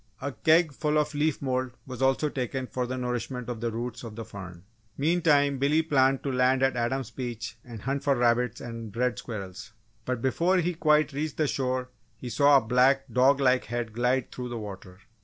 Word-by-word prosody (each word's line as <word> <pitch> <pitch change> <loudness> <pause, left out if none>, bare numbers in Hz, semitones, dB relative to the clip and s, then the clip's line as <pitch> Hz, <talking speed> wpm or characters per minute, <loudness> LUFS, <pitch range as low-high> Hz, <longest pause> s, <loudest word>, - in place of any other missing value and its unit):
A 140 +2 -3
keg 160 +7 +3
full 150 +1 0
of 150 0 +1
leaf 150 0 0
mould 130 -1 -1
was 130 -1 -8
also 135 +3 +2
taken 130 -1 -3
for 125 0 -3
the 130 +1 -3
nourishment 125 0 -3
of 115 -2 -5
the 120 - 0
roots 120 +2 -5
of 115 -2 -8
the 115 0 -6
ferns. 95 -5 -10 0.3
Meantime, 145 -3 +3
Billy 150 +4 +3
planned 135 -3 +2
to 140 - -1
land 130 +1 +2
at 130 -1 +2
Adams' 120 +1 -1
Beach 120 -2 -5
and 115 -4 -10
hunt 135 +2 -2
for 140 -1 +3
rabbits 120 -1 +1
and 115 -2 -7
red 125 0 0
squirrels, 110 -3 -7 0.3
but 125 -1 -2
before 170 +9 +2
he 175 0 +1
quite 155 -2 +2
reached 150 +1 -3
the 155 - +2
shore 130 -2 -1 0.3
he 125 +2 -7
saw 140 +5 +6
a - - +3
black 125 +4 +3
dog 130 +2 +4
like 130 -2 +3
head 120 -2 -4
glide 125 +2 0
through 125 -1 -6
the 120 - -4
water. 95 -4 -8
130 Hz, 200 wpm, -27 LUFS, 120-140 Hz, 0.3 s, saw